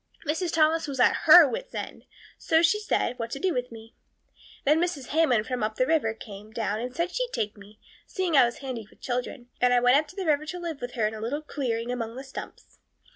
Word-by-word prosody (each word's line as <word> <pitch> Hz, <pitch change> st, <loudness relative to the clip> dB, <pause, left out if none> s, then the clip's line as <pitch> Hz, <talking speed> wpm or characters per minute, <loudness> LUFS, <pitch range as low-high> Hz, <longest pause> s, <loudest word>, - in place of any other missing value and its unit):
Mrs. 325 Hz, +3 st, -1 dB
Thomas 320 Hz, 0 st, +2 dB
was 275 Hz, -2 st, -5 dB
at -, -, +5 dB
her -, -, +10 dB
wits' -, -, -6 dB
end, -, -, -6 dB, 0.3 s
so 320 Hz, +1 st, +2 dB
she 385 Hz, +6 st, +3 dB
said, 250 Hz, -, -1 dB
what 230 Hz, 0 st, -3 dB
to 275 Hz, -, -5 dB
do 370 Hz, +3 st, 0 dB
with 250 Hz, 0 st, -3 dB
me. 225 Hz, 0 st, -12 dB, 0.7 s
Then 305 Hz, +4 st, +4 dB
Mrs. 330 Hz, -8 st, -2 dB
Hammond 280 Hz, -9 st, +2 dB
from 250 Hz, -1 st, -3 dB
up 215 Hz, 0 st, -1 dB
the 255 Hz, -, +2 dB
river 260 Hz, -7 st, +1 dB
came 210 Hz, -1 st, -11 dB
down 220 Hz, -1 st, -2 dB
and 250 Hz, +2 st, -5 dB
said 340 Hz, +2 st, -1 dB
she'd -, -, -2 dB
take 210 Hz, -, -2 dB
me, 205 Hz, +1 st, -16 dB, 0.3 s
seeing 370 Hz, -4 st, -1 dB
I 265 Hz, -3 st, +7 dB
was 235 Hz, -, -3 dB
handy 235 Hz, -5 st, -5 dB
with -, -, -23 dB
children, 245 Hz, 0 st, -4 dB
and 245 Hz, 0 st, +4 dB
I -, -, +5 dB
went 245 Hz, +2 st, +5 dB
up 305 Hz, +1 st, 0 dB
the 370 Hz, +4 st, -6 dB
river 305 Hz, -1 st, +1 dB
to 360 Hz, -, -5 dB
live 335 Hz, -4 st, -5 dB
with 245 Hz, 0 st, -5 dB
her 230 Hz, -4 st, 0 dB
in 215 Hz, -, -1 dB
a 215 Hz, -, -7 dB
little 285 Hz, +7 st, -3 dB
clearing 245 Hz, -5 st, -3 dB
among 230 Hz, -2 st, -4 dB
the 265 Hz, -, -7 dB
stumps. 270 Hz, -, -10 dB
255 Hz, 235 wpm, -26 LUFS, 230-320 Hz, 0.7 s, her